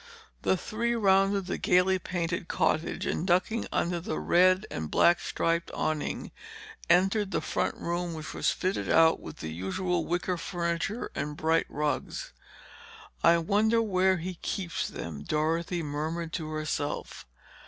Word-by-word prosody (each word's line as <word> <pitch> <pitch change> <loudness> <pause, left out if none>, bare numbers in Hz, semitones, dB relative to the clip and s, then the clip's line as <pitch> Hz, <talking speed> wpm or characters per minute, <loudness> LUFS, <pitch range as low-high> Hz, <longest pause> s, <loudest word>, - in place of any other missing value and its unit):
The 190 - +2
three 235 +5 -1
rounded 195 -2 +3
the 185 - -3
gaily 185 +1 +3
painted 170 -1 -3
cottage 160 -2 0
and 175 - -1
ducking 190 +6 +1
under 175 0 0
the 165 -2 -4
red 185 +3 +4
and 80 -1 -4
black 175 0 +4
striped 170 0 -1
awning, 155 -1 -2 0.6
entered 195 +3 +3
the - - 0
front 155 - -1
room 175 0 -3
which 155 0 -6
was - - +1
fitted 185 +1 -1
out 165 0 +5
with 80 - -9
the 80 0 -5
usual 165 - -1
wicker 175 +1 -1
furniture 170 +4 -2
and 150 +1 -4
bright 160 +1 +2
rugs. 150 -2 -3 0.9
"I 170 0 +6
wonder 210 +7 +2
where 190 -3 +2
he 175 +1 -6
keeps 180 -5 -2
them," 75 -4 -6
Dorothy 165 - 0
murmured 160 +3 -3
to 160 -3 -3
herself. 155 - -3
170 Hz, 145 wpm, -29 LUFS, 155-185 Hz, 0.9 s, I